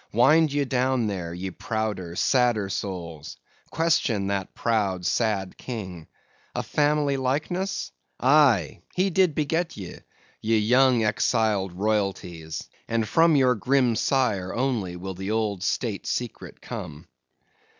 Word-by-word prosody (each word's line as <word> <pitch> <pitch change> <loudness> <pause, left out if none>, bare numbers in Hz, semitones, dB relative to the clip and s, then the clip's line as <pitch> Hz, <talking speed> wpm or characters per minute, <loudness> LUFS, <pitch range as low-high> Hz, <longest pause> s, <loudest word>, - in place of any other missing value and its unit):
Wind 150 +7 +4
ye 145 0 0
down 130 -1 +1
there, 95 -5 -3
ye 90 +2 -5
prouder, 105 -6 -3
sadder 120 -4 +2
souls! 85 -6 -5 0.3
question 145 -11 +1
that 100 -1 -3
proud, 100 -6 0
sad 100 -3 0
king! 95 -9 -7 0.5
A - - -1
family 145 -1 +1
likeness! 155 +9 -2 0.3
aye, 130 - +4
he 190 +2 +1
did 180 -3 +3
beget 160 +3 -1
ye, 95 -4 -8 0.4
ye 110 +1 +2
young 125 +2 +4
exiled 105 -3 +1
royalties; 95 -5 -2 0.2
and 115 -1 0
from 165 +7 +4
your 130 -3 +4
grim 125 +1 +2
sire 110 -9 0
only 115 -8 -1
will 95 +2 -6
the 95 +2 -6
old 105 -4 -1
State 105 +1 -2
secret 120 -3 -4
come. 75 +3 -7
110 Hz, 125 wpm, -25 LUFS, 95-135 Hz, 0.5 s, Wind